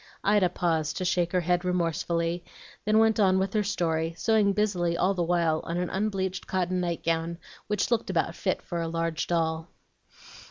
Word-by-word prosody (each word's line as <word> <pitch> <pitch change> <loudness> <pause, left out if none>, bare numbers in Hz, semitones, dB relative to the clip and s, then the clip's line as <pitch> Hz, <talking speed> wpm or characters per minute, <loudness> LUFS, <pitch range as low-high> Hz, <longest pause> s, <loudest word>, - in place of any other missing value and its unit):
Ida 200 -3 +4
paused 160 -3 -1
to 185 - -2
shake 175 -1 +1
her 180 - +2
head 175 +1 +1
remorsefully, 170 -1 -1 0.4
then 215 +1 +3
went 220 -1 +4
on 190 -2 +4
with 190 0 0
her 215 - +2
story, 165 -5 -1
sewing 215 -2 +3
busily 185 -5 0
all 195 - +2
the 180 - -2
while 170 -2 +1
on 170 - -3
an 180 0 -2
unbleached 190 -2 -2
cotton 185 -1 0
night 170 -2 -2
gown 165 +1 -1 0.3
which 210 +2 0
looked 235 -2 +1
about - - 0
fit - - -1
for 170 -1 -3
a 165 - -2
large 165 -1 -2
doll. 160 -1 0
175 Hz, 185 wpm, -27 LUFS, 165-195 Hz, 0.4 s, Ida